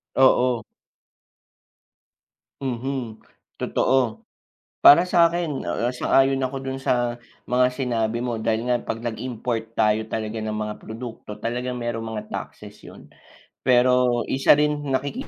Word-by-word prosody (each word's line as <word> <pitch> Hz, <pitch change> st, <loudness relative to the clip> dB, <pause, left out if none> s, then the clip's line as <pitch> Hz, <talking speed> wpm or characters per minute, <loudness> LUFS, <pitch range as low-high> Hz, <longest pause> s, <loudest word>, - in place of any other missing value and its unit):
Oo. 125 Hz, -3 st, +4 dB, 2.0 s
Mhm, 130 Hz, -3 st, -3 dB, 0.4 s
totoo. 125 Hz, -4 st, 0 dB, 0.6 s
Para 170 Hz, +5 st, +8 dB
sa'kin, 170 Hz, -4 st, +2 dB
ah, 115 Hz, +8 st, -1 dB
ah, -, -, -2 dB
sang-ayon 135 Hz, +1 st, +2 dB
ako 135 Hz, +1 st, -3 dB
dun 135 Hz, 0 st, -4 dB
sa 120 Hz, -2 st, 0 dB, 0.3 s
mga 125 Hz, 0 st, +4 dB
sinabi 115 Hz, -3 st, -1 dB
mo 120 Hz, -2 st, -2 dB
dahil 115 Hz, +2 st, -1 dB
nga 125 Hz, -, +3 dB
'pag 115 Hz, -, -4 dB
nag-import 115 Hz, -1 st, -4 dB
tayo 110 Hz, 0 st, +3 dB
talaga 110 Hz, 0 st, -3 dB
ng 110 Hz, 0 st, -3 dB
mga 105 Hz, 0 st, -3 dB
produkto, 110 Hz, -2 st, -8 dB
talagang 125 Hz, +2 st, -3 dB
merong 120 Hz, -1 st, -3 dB
mga 110 Hz, -1 st, -4 dB
taxes -, -, -8 dB
yun. -, -, -13 dB, 0.5 s
Pero 125 Hz, -1 st, +3 dB
isa 135 Hz, +2 st, +4 dB
rin 150 Hz, 0 st, +1 dB
nakiki 140 Hz, -, -2 dB
125 Hz, 125 wpm, -23 LUFS, 115-130 Hz, 2.0 s, Para